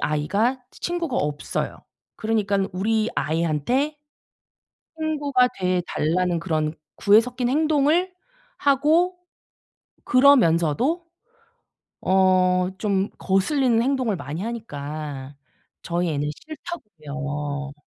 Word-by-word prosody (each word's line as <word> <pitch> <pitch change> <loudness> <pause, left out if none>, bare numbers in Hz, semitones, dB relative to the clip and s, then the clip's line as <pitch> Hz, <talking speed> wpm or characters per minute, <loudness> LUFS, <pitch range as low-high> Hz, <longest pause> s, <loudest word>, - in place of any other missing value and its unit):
아이가 200 - 0
치 - - -18
친구가 345 -6 -2
없어요. 150 0 -2 0.3
그러니깐 205 -3 0
우리 215 +4 +1
아이한테 170 - 0 1.0
친구가 290 -5 +1
돼 180 -1 +1
달라는 175 +2 0
그런 155 -2 -1 0.2
구애 210 +2 +6
섞인 245 +1 -2
행동을 310 +5 +2 0.4
하고 315 +6 +3 0.9
그러면서도 255 - +4 1.0
어 185 -1 +4 0.4
좀 200 -1 0
거슬리는 230 +5 +2
행동을 255 -5 0
많이 160 +1 -5
하니까 150 - -6 0.5
저희 170 0 -1
애는 145 -1 -1 0.2
싫다고요. 150 - -6
200 Hz, 220 characters per minute, -23 LUFS, -, 1.0 s, 구애